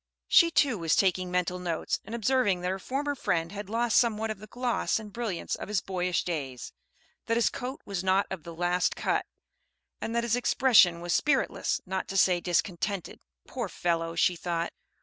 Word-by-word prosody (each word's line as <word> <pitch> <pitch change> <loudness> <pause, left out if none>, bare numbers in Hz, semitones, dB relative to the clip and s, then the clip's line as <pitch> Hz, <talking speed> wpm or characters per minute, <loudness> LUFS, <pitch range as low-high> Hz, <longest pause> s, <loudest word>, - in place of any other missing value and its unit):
She 335 -2 +6
too 275 - +2
was 165 -2 +2
taking 185 -1 +2
mental 180 0 -1
notes, 170 -3 -2
and 230 - -6
observing 230 -5 +1
that 180 +1 -1
her 190 - -3
former 280 +7 -2
friend 175 -10 -1
had 205 -1 -7
lost 230 +1 +3
somewhat 220 -2 0
of 215 - -6
the 215 - -11
gloss 245 +2 -1
and 215 -2 -8
brilliance 225 -8 -3
of - - -4
his 210 -1 +1
boyish 180 -1 -1
days; 135 -8 -5 0.5
that 230 - +2
his 235 - +3
coat 255 +2 -6
was 195 -3 -3
not 190 +1 +3
of 190 -3 -4
the 170 +1 -9
last 175 +1 +1
cut; - - -1 0.7
and 225 - -3
that 235 - +1
his 235 0 +1
expression 235 -9 +4
was 175 -1 -1
spiritless, 275 - +1
not 190 0 -3
to 195 - -3
say 180 -2 +4
discontented. 180 +2 -1 0.3
"Poor 240 -6 -4
fellow!" 165 -1 -1
she 175 +1 +3
thought. 170 0 -3
190 Hz, 190 wpm, -28 LUFS, 175-230 Hz, 0.7 s, She